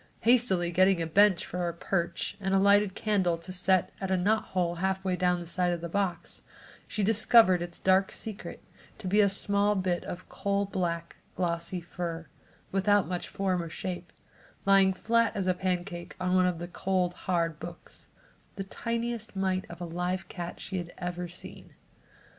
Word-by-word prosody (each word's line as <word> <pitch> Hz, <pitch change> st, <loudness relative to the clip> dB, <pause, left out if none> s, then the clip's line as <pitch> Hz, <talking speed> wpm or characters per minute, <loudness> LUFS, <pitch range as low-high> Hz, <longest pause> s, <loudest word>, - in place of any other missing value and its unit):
Hastily 225 Hz, -8 st, +3 dB
getting 185 Hz, +1 st, +4 dB
a 165 Hz, -, 0 dB
bench 190 Hz, +2 st, +4 dB
for 180 Hz, -1 st, -3 dB
a 170 Hz, -, -7 dB
perch 170 Hz, 0 st, -2 dB
and 195 Hz, -1 st, 0 dB
a -, -, +5 dB
lighted 200 Hz, 0 st, +4 dB
candle 190 Hz, -6 st, +1 dB
to 170 Hz, +3 st, -9 dB
set 185 Hz, 0 st, +2 dB
at 190 Hz, -, -2 dB
a 190 Hz, -, +2 dB
knot 210 Hz, +5 st, +2 dB
hole 175 Hz, -2 st, -1 dB
half 190 Hz, +2 st, -1 dB
way 185 Hz, -1 st, +1 dB
down 180 Hz, 0 st, +1 dB
the 175 Hz, -, -7 dB
side 175 Hz, +1 st, +1 dB
of 175 Hz, -, -2 dB
the 170 Hz, -, -5 dB
box, 180 Hz, -2 st, -2 dB, 0.5 s
she 210 Hz, -, -2 dB
discovered 215 Hz, -3 st, +5 dB
its 175 Hz, -1 st, -5 dB
dark 190 Hz, +1 st, +3 dB
secret 215 Hz, -2 st, -7 dB, 0.3 s
to 215 Hz, -, -7 dB
be 205 Hz, +3 st, +4 dB
a 200 Hz, -, +4 dB
small 200 Hz, +1 st, +2 dB
bit 185 Hz, -2 st, 0 dB
of 180 Hz, +1 st, -7 dB
coal 200 Hz, 0 st, -1 dB
black 170 Hz, -3 st, -3 dB, 0.2 s
glossy 170 Hz, 0 st, -2 dB
fur, 170 Hz, -1 st, -5 dB, 0.5 s
without 200 Hz, +1 st, +3 dB
much 180 Hz, -1 st, -3 dB
form 185 Hz, -2 st, -1 dB
or 170 Hz, -, -6 dB
shape, 175 Hz, +1 st, -5 dB, 0.5 s
lying 195 Hz, -1 st, +6 dB
flat 230 Hz, +4 st, +1 dB
as 195 Hz, -, -1 dB
a 185 Hz, -, +3 dB
pancake 180 Hz, -1 st, -3 dB
on 180 Hz, 0 st, 0 dB
one 185 Hz, 0 st, +4 dB
of 180 Hz, -2 st, -1 dB
the 175 Hz, +1 st, -6 dB
cold 180 Hz, 0 st, 0 dB, 0.2 s
hard 165 Hz, -3 st, +1 dB
books; 170 Hz, +1 st, -10 dB, 0.5 s
the 195 Hz, -, -4 dB
tiniest 230 Hz, +2 st, -4 dB
mite 190 Hz, -1 st, 0 dB
of 170 Hz, -, -9 dB
a 175 Hz, -, -4 dB
live 180 Hz, +2 st, -3 dB
cat 175 Hz, -1 st, -6 dB
she 190 Hz, -1 st, -4 dB
had 175 Hz, 0 st, -7 dB
ever 175 Hz, 0 st, -4 dB
seen. 175 Hz, +1 st, -9 dB
185 Hz, 180 wpm, -29 LUFS, 175-195 Hz, 0.5 s, lying